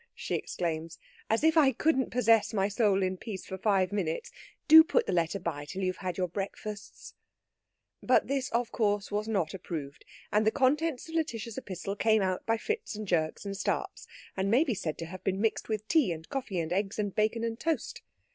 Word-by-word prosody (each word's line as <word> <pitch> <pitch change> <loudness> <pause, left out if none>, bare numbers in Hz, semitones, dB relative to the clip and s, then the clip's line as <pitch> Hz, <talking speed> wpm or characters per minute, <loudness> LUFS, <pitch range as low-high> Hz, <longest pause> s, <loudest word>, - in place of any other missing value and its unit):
she - - -5
exclaims. 165 -1 -3 0.3
"As 225 +5 +1
if 320 0 +4
I 290 -4 +6
couldn't 265 +1 +1
possess 225 -2 +3
my 195 -1 +2
soul 205 -2 +2
in 185 0 -1
peace 195 -1 -7
for 190 - -5
five 190 -2 +2
minutes! 180 -6 -2 0.4
Do 320 +1 +11
put 435 +8 +1
the - - -1
letter 170 +2 +1
by 165 -6 -4
till 185 +6 -5
you've 185 0 -1
had 180 -2 -4
your 185 -1 0
breakfasts." 200 +3 -6 0.9
But - - +3
this 270 -2 -1 0.2
course 205 -2 0
was 210 +1 -1
not 195 -7 0
approved, 155 -6 -6 0.3
and 210 +1 +3
the 220 - +4
contents 290 +3 +1
of 325 - -10
Lætitia's 230 -9 -2
epistle 195 -3 -5
came 220 0 +3
out 185 -1 -2
by 225 0 +2
fits 440 - -3
and 215 0 -6
jerks 160 0 0
and 200 0 -4
starts, 195 - -3 0.3
and 190 +1 0
may 245 +8 +5
be 275 -7 -1
said 160 -6 -3
to 165 - -5
have 185 +3 -9
been 190 0 0
mixed 225 +1 0
with 215 -1 -2
tea 300 - +3
and 160 -1 -6
coffee 250 -9 -3
and 165 +1 -2
eggs 195 +1 -1
and 205 -2 -1
bacon 220 +1 +1
and 230 0 -3
toast. 325 0 -2
205 Hz, 205 wpm, -30 LUFS, 185-230 Hz, 0.9 s, Do